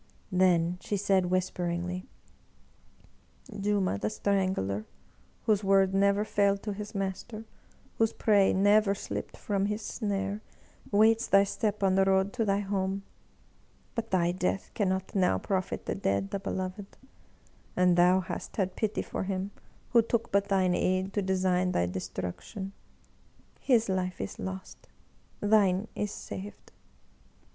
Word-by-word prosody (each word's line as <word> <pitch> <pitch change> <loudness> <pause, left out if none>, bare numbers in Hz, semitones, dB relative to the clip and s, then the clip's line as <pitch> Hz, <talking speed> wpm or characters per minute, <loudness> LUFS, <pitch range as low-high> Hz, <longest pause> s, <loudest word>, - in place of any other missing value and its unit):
Then 180 -1 +3
she 205 - -2
said 190 -2 +2
whisperingly: 180 0 -2 1.5
"Juma 200 - +1
the 105 - -1
Strangler, 185 - -1 0.6
whose 210 -2 +2
word 195 -1 +4
never 200 +1 +3
failed 200 -2 +1
to 210 - -3
his 210 +1 -7
master, 195 +3 -4 0.5
whose 225 0 +3
prey 205 -3 +3
never 205 +1 +4
slipped - - -6
from 200 -1 -1
his 210 +1 -3
snare, 200 -1 -2 0.5
waits 220 +3 +4
thy 195 0 +6
step 205 +1 -2
on 190 -1 +4
the 195 0 +4
road 190 +1 +2
to 235 - 0
thy 200 0 +1
home! 195 -1 -2 0.9
But 230 -1 -3
thy 175 -2 +2
death 185 +1 -2
cannot 190 -2 -1
now 180 - +3
profit 185 - -2
the - - -1
dead, 100 - -1
the - - -2
beloved. 190 +1 -5 0.8
And 180 -1 +4
thou 180 +2 +5
hast 180 - -6
had 190 -3 0
pity 215 -1 -1
for - - -4
him 190 +1 -3 0.4
who 235 - +6
took 230 0 -1
but 200 0 +2
thine 190 -2 +2
aid 185 +2 0
to 205 - +1
design 185 -1 +1
thy 85 - +2
destruction. 95 - -5 0.9
His 235 -4 +3
life 185 -1 -1
is 95 - -5
lost, 95 0 -7 0.5
thine 205 -1 +3
is 210 - -1
saved 200 0 -8
195 Hz, 135 wpm, -29 LUFS, 185-205 Hz, 1.5 s, thy